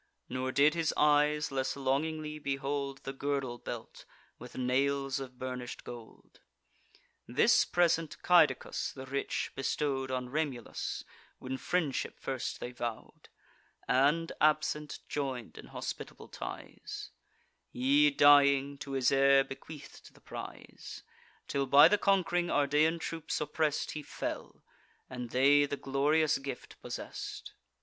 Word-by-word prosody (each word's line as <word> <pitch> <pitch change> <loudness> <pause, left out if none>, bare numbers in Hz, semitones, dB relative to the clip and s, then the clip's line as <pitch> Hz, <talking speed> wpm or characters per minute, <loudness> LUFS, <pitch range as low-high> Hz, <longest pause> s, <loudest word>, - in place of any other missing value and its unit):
Nor 130 +1 -2
did 145 +3 +4
his 165 -2 0
eyes 150 0 +3
less 135 -1 -1
longingly 150 +3 -1
behold 140 -1 -3
The 135 - -5
girdle 135 -3 -2
belt, - - -8 0.4
with 125 +1 -10
nails 135 +2 0
of 130 -2 -8
burnish'd 125 -1 -6
gold. 120 -2 -12 0.9
This - - +4
present 165 -3 +1
Caedicus 175 -4 +3
the 135 -1 -8
rich 140 +1 -2
bestow'd 135 0 -1
On 130 -1 -2
Remulus, 140 -4 -3 0.3
when 130 +1 -5
friendship 150 +1 -2
first 130 -2 -4
they 120 - -5
vow'd, 120 -2 -6 0.6
And, 150 +6 +2
absent, 150 -1 +1
join'd 130 -5 -4
in - - -11
hospitable - - -7
ties: - - -8 0.6
He, 140 - +4
dying, 140 -1 +5
to 140 - -6
his 130 -2 +2
heir 135 0 +5
bequeath'd 140 +2 -11
the - - -20
prize; - - -9 0.4
Till, 140 -1 -1
by 140 +4 +8
the 210 +4 +2
conqu'ring 175 -3 +2
Ardean 150 +3 +3
troops 165 -1 -3
oppress'd, 150 0 -1
He 150 - -5
fell; - - -6 0.5
and 125 -2 -5
they 145 +3 +4
the 140 - -3
glorious 145 +3 +2
gift 135 -2 -8
possess'd. - - -7
140 Hz, 125 wpm, -31 LUFS, 130-150 Hz, 0.9 s, by